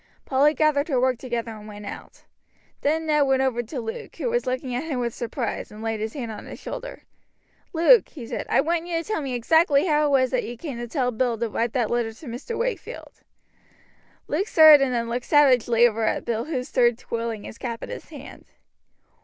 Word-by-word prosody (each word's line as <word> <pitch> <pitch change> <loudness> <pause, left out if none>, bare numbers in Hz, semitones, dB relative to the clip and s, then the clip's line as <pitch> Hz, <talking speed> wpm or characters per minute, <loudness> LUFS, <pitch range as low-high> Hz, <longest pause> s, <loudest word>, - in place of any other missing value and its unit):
Polly 285 +3 +3
gathered 305 -1 +2
her 270 -6 +1
work 255 -1 +1
together 235 -3 -4
and 215 -1 -10
went 210 -1 -9
out. - - -10 0.6
Then 315 +3 0
Ned 300 -2 +3
went 265 0 +2
over 245 -3 0
to 245 +4 -6
Luke, 225 -1 -7
who 480 - -2
was 485 - -1
looking 255 0 -2
at 250 +6 -2
him 300 -5 -3
with 235 -2 -2
surprise, 235 -1 -4
and 210 +1 -10
laid 225 -1 -2
his 220 +4 -4
hand 240 -5 -4
on 210 - -9
his - - -8
shoulder. - - -7 0.7
"Luke," 355 +8 +5
he 260 -7 -9
said, - - -5
"I - - +4
want 335 +3 -1
you 340 -1 -1
to 330 - -2
tell 430 -7 -1
me 265 -3 -3
exactly 290 +4 +3
how 300 -3 +2
it 275 -2 +4
was 260 -1 +1
that 255 - 0
you 240 +1 -7
came 275 -4 -6
to 240 - -5
tell 250 0 -1
Bill 240 0 0
to 235 +1 -1
write 230 +2 -1
that 240 -5 0
letter 240 -2 0
to 265 - -14
Mr. 255 - -6
Wakefield?" 485 +1 -5 1.1
Luke 370 +8 -1
started 310 -6 +8
and 265 - 0
then 235 -1 -1
looked 240 +1 -3
savagely 245 -5 +5
over 225 -1 -2
at 220 - 0
Bill, 230 0 -2
who 280 -5 -2
stood 240 -2 +2
twirling 230 -3 -4
his - - -10
cap 235 -2 -5
in - - -7
his - - -7
hand. 290 -3 -11
255 Hz, 220 wpm, -24 LUFS, 235-300 Hz, 1.1 s, started